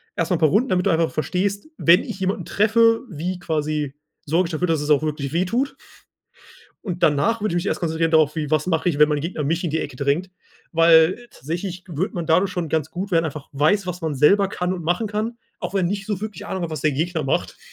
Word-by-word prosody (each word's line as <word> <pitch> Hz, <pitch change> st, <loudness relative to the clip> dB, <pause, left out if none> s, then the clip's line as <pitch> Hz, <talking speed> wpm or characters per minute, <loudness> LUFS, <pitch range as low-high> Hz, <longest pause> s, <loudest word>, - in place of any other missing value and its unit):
Erstmal 170 Hz, +1 st, 0 dB
'n -, -, -9 dB
paar 155 Hz, -, +4 dB
Runden, 225 Hz, -, +2 dB
damit 180 Hz, -1 st, +1 dB
du -, -, +3 dB
einfach 165 Hz, 0 st, +1 dB
verstehst, 195 Hz, -, -2 dB
wenn 170 Hz, +2 st, +5 dB
ich 190 Hz, -, -7 dB
jemanden 190 Hz, -2 st, -2 dB
treffe, 225 Hz, +2 st, +3 dB
wie 175 Hz, +2 st, -4 dB
quasi 150 Hz, -4 st, -2 dB, 0.3 s
sorge 165 Hz, +4 st, +1 dB
ich -, -, -8 dB
dafür, 170 Hz, +3 st, -1 dB
dass 160 Hz, -3 st, +1 dB
es 150 Hz, -, -4 dB
auch 150 Hz, -1 st, +4 dB
wirklich 150 Hz, -2 st, -3 dB
weh 175 Hz, +3 st, +1 dB
tut. 245 Hz, +9 st, -1 dB, 1.1 s
Und 180 Hz, -4 st, -4 dB
danach 200 Hz, +10 st, +2 dB
würde 215 Hz, -4 st, -1 dB
ich -, -, -1 dB
mich 175 Hz, +2 st, -1 dB
erst -, -, -1 dB
konzentrieren 165 Hz, -1 st, 0 dB
darauf, 155 Hz, -2 st, +4 dB
wie 155 Hz, -2 st, -3 dB
was 155 Hz, -1 st, +2 dB
mache 165 Hz, -1 st, 0 dB
ich, 155 Hz, -4 st, 0 dB
wenn 150 Hz, 0 st, +6 dB
mein 150 Hz, -1 st, 0 dB
Gegner 160 Hz, 0 st, -3 dB
mich 165 Hz, +5 st, -1 dB
in 175 Hz, -, -1 dB
die 160 Hz, +2 st, -1 dB
Ecke 135 Hz, -5 st, -6 dB
drängt? 145 Hz, +7 st, 0 dB, 0.4 s
Weil, 165 Hz, +1 st, +5 dB
äh, 240 Hz, -, -15 dB
tatsächlich 175 Hz, +5 st, -5 dB
würde 175 Hz, +3 st, -3 dB
man 175 Hz, -4 st, -3 dB
dadurch 180 Hz, +4 st, +2 dB
schon 175 Hz, -3 st, -3 dB
ganz 160 Hz, -1 st, -1 dB
gut 195 Hz, +3 st, -5 dB
werden, 165 Hz, -1 st, +3 dB
einfach 150 Hz, -2 st, -6 dB
weiß, 155 Hz, +8 st, +2 dB
was 180 Hz, 0 st, -5 dB
man 160 Hz, -3 st, -2 dB
selber 195 Hz, +9 st, +4 dB
kann 180 Hz, -2 st, -2 dB
und 175 Hz, -2 st, -6 dB
machen 175 Hz, +7 st, 0 dB
kann, 215 Hz, +3 st, -3 dB, 0.2 s
auch -, -, -5 dB
wenn 190 Hz, -3 st, +1 dB
nicht 195 Hz, +1 st, -3 dB
so 205 Hz, -3 st, -3 dB
wirklich 210 Hz, -1 st, -6 dB
Ahnung 190 Hz, -3 st, -4 dB
hat, 170 Hz, -, -3 dB
was 155 Hz, -3 st, -5 dB
der 155 Hz, -, +2 dB
Gegner 160 Hz, +3 st, -1 dB
macht. 135 Hz, -, -1 dB
170 Hz, 245 wpm, -22 LUFS, 155-190 Hz, 1.1 s, wenn